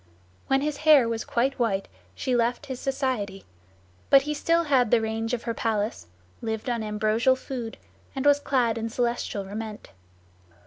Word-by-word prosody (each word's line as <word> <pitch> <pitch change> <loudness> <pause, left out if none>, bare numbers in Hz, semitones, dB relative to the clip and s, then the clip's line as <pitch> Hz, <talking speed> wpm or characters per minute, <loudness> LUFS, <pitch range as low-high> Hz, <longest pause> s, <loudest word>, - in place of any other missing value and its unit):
When 270 0 +2
his 295 0 -2
hair 300 -5 +6
was 230 -1 -2
quite 260 +3 0
white 200 -5 0 0.3
she 255 - -1
left 240 +1 0
his 260 -2 -6
society; 255 -8 -2 0.6
but 275 -1 +7
he 300 +1 -2
still 335 +3 +2
had 265 -7 +3
the 240 - +5
range 225 +1 -2
of 245 -2 -2
her 230 - -2
palace, 215 - -2 0.3
lived 220 +2 -3
on 235 -1 -1
ambrosial 215 +4 +2
food, 250 -3 -6 0.4
and 270 +1 -3
was 285 0 +6
clad 245 -5 +1
in 225 0 -3
celestial 235 -4 -2
raiment. 215 - -7
235 Hz, 165 wpm, -26 LUFS, 220-270 Hz, 0.6 s, but